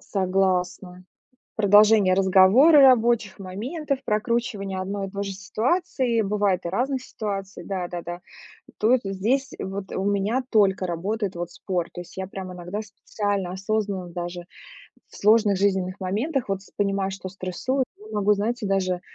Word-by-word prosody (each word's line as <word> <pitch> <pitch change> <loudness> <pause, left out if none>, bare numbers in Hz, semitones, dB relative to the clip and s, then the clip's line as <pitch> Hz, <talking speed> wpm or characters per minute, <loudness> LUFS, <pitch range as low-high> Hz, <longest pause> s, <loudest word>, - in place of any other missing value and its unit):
Согласна. 185 -1 -1 0.5
Продолжение 205 -2 +5
разговора, 195 - +6
рабочих 235 -6 +4
моментов, 260 - -4
прокручивание 210 -3 -1
одной 195 +1 -3
и - - -9
той 200 0 -4
же 195 - -4
ситуации, 240 - 0
бывает 200 -3 0
и - - -1
разных 260 +6 -1
ситуаций, 195 -2 -5
да 185 -3 -3
да-да. 175 0 -6 0.6
Тут, 235 +4 +3
здесь 220 +8 0
вот 195 0 -5
у 190 - -2
меня 205 +6 0
только 195 -4 +3
работает 195 +4 -2
вот 175 0 -4
спорт. 180 -2 -3
То - - -7
есть 175 - -12
я 190 0 -4
прям 190 -1 -7
иногда 180 +4 -5
специально 200 -2 -3
осознанно 195 -2 -2
даже 175 0 -6 0.7
в - - -14
сложных 210 -2 +4
жизненных 190 -1 0
моментах 235 - -1
вот 195 -1 -2
с - - -19
понимаю, 195 -1 0
что 190 -1 -7
стрессую, 195 +8 -2
и 215 +1 -13
могу, 210 0 +2
знаете, 220 +3 -2
даже 185 -2 0
195 Hz, 145 wpm, -24 LUFS, 185-220 Hz, 0.7 s, разговора